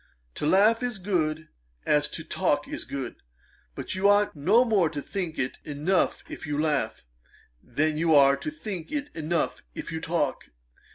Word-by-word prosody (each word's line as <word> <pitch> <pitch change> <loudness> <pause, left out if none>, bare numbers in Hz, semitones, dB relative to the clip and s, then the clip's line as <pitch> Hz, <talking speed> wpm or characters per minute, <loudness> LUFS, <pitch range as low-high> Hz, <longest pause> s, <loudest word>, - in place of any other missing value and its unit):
To 150 - -2
laugh 210 +7 +5
is 245 -3 -2
good, 160 -5 -1 0.4
as 150 0 +2
to 160 - -5
talk 155 -3 0
is - - -5
good. 135 -3 -5 0.6
But - - -5
you 190 +2 +3
ought 205 -2 +3
no 200 - +4
more 200 -8 +3
to 150 -1 -5
think 175 +1 -4
it 130 - -2
enough 155 +6 0
if - - -8
you 145 0 -1
laugh, 145 - 0 0.6
than 155 +5 0
you 165 -1 +4
are 140 -1 +7
to 140 - -5
think 165 +2 -6
it 290 -1 -2
enough 160 +1 -1
if - - -6
you 160 0 -4
talk. 160 -5 -1
160 Hz, 170 wpm, -27 LUFS, 150-195 Hz, 0.6 s, are